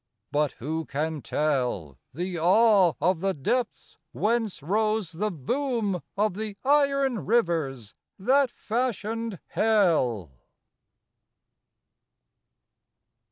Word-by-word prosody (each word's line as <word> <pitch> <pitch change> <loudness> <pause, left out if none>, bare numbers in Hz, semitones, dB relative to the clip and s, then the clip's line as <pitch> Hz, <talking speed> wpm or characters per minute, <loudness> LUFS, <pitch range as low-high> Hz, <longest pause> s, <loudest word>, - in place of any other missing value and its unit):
But 150 -1 +1
who 160 +6 -4
can 150 +2 -3
tell 125 - -1
The 175 +4 -4
awe 190 0 +5
of 180 -1 +2
the 195 +2 -1
depths 240 - -2
whence 220 -7 -1
rose 215 +1 0
the 210 +6 -2
boom 210 - -2 0.2
Of 210 -1 +2
the 210 0 -5
iron 275 -4 +2
rivers 160 - 0 0.2
that 265 +6 +3
fashioned 230 -2 -3
Hell! 160 - +2
195 Hz, 90 wpm, -26 LUFS, 155-225 Hz, 0.2 s, awe